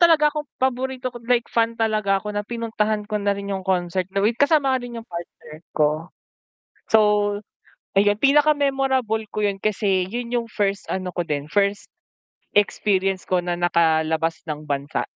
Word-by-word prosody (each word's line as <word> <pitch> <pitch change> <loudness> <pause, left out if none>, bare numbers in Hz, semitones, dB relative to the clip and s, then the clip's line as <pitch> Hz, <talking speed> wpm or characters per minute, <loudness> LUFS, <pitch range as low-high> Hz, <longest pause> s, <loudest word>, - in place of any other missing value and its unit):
talaga 315 -3 +5
akong 300 -1 -4
paborito 255 0 -1
ko 240 - -9
like 240 -1 +3
fan 230 0 +1
talaga 215 -3 +1
ako 210 +2 -4
na 205 - -1
pinuntahan 215 -1 -2
ko 210 0 -2
na 200 0 +1
rin 200 0 -4
yung 190 - -2
concert 185 -1 -1
na 195 +1 -1
with 220 - +4
kasama 285 -2 +4
nga 260 - +1
rin 245 -1 -7
yung 230 - -7
partner 170 -3 -9 0.2
ko. 155 +2 +1 0.8
So 220 - +6 0.9
ayun, 205 +1 +3
pinaka 295 +2 +5
memorable 270 -5 +1
ko 210 +1 -3
'yun 200 -1 0
kasi 195 -3 +1
'yun 235 +3 -5
yung 240 -1 -1
first 200 -2 -1
ano 185 -1 -3
ko 175 -1 -3
din, 145 0 -3
first 200 0 0 0.6
experience 195 -2 +1
ko 180 -1 +1
na 175 0 -2
nakalabas 160 -1 +2
ng 150 -1 -4
bansa. 140 -1 -2
205 Hz, 170 wpm, -23 LUFS, 180-240 Hz, 0.9 s, So